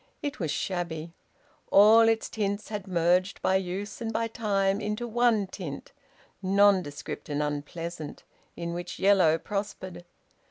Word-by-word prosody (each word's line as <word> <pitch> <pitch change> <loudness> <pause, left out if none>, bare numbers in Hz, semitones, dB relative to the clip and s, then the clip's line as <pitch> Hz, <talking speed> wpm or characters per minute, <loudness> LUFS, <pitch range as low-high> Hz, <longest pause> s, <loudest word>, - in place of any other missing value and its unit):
It 290 0 -3
was 165 -5 -2
shabby. 170 -2 -3 0.6
All 225 +3 +7
its 225 0 0
tints 205 -1 -3
had 210 -2 -5
merged 180 +1 +2
by 190 - +3
use 190 +4 -5
and 225 -1 -2
by 230 +1 -1
time 200 -3 0
into 210 +3 -3
one 235 -3 +2
tint, 175 -7 -7 0.5
nondescript 190 -8 +1
and 145 0 0
unpleasant, 155 +2 -5 0.3
in 170 0 -4
which 175 +1 -5
yellow 190 -5 +4
prospered. 195 -2 -5
195 Hz, 130 wpm, -28 LUFS, 170-210 Hz, 0.6 s, All